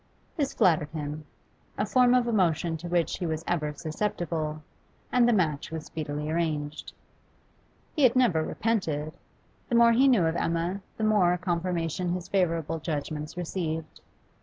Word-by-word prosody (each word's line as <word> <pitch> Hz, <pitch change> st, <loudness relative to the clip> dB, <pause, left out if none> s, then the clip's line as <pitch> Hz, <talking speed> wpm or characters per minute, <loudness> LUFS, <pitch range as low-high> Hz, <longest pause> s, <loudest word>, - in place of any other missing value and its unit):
This 280 Hz, -4 st, -1 dB
flattered 155 Hz, -4 st, +3 dB
him 150 Hz, -1 st, -5 dB, 0.5 s
a 205 Hz, -, +1 dB
form 250 Hz, +3 st, +4 dB
of 245 Hz, -1 st, +2 dB
emotion 170 Hz, -6 st, +1 dB
to 170 Hz, +3 st, -7 dB
which 175 Hz, -1 st, 0 dB
he 175 Hz, -, -2 dB
was 160 Hz, 0 st, -3 dB
ever 150 Hz, -4 st, 0 dB
susceptible 155 Hz, -1 st, -3 dB, 0.5 s
and 245 Hz, -1 st, +4 dB
the -, -, +5 dB
match 160 Hz, -9 st, 0 dB
was 160 Hz, -1 st, -6 dB
speedily 150 Hz, -1 st, -4 dB
arranged. 155 Hz, -3 st, -2 dB, 1.0 s
He 305 Hz, -, 0 dB
had 255 Hz, -2 st, +5 dB
never 230 Hz, -11 st, +3 dB
repented. 155 Hz, -9 st, -1 dB, 0.6 s
The 240 Hz, -, +1 dB
more 235 Hz, 0 st, +7 dB
he 255 Hz, +4 st, +5 dB
knew 235 Hz, -10 st, +4 dB
of 160 Hz, 0 st, 0 dB
Emma, 170 Hz, +4 st, -1 dB, 0.2 s
the 220 Hz, -, -3 dB
more 195 Hz, -5 st, +3 dB
confirmation 175 Hz, -1 st, -1 dB
his 180 Hz, -1 st, -4 dB
favourable 165 Hz, -4 st, 0 dB
judgments 155 Hz, 0 st, -4 dB
received. 160 Hz, -3 st, -4 dB
170 Hz, 150 wpm, -27 LUFS, 155-205 Hz, 1.0 s, more